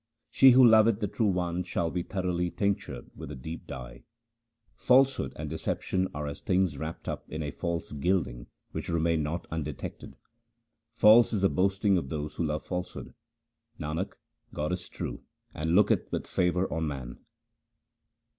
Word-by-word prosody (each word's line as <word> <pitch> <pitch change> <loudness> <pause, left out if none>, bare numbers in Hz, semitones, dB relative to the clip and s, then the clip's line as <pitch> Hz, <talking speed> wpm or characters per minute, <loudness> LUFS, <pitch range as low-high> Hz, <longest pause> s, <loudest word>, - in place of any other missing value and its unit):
She 135 - +7
who 130 0 +8
loveth 110 -1 +5
the 105 - -1
True 110 +3 0
One 90 -2 0
shall 85 -2 -2
be 90 - -1
thoroughly 90 -1 -1
tinctured 100 +2 -2
with - - -8
a - - -6
deep 80 +6 -8
dye. - - -8 0.7
Falsehood 135 +1 +3
and - - -5
deception 95 0 -1
are 75 0 -4
as 70 0 -6
things 95 -5 +1
wrapped 80 +4 -6
up - - -5
in 75 -1 -4
false 85 0 -3
gilding 75 -6 -1 0.2
which - - -4
remain 85 -1 +1
not 80 +3 -3
undetected. 75 -3 -5 0.8
False 115 +1 +6
is 100 -3 0
the 95 - +5
boasting 95 +1 +2
of 70 - -7
those 75 0 -4
who - - -2
love 75 -1 -2
falsehood. 90 0 -5 0.7
Nanak, 80 +5 -3 0.4
God 75 +2 -1
is 90 0 -4
true - - -5 0.3
and 80 +2 0
looketh 105 +1 +3
with - - -2
favour 90 +1 +1
on 80 -1 -1
man. 65 -4 -6
85 Hz, 155 wpm, -29 LUFS, 75-95 Hz, 0.8 s, who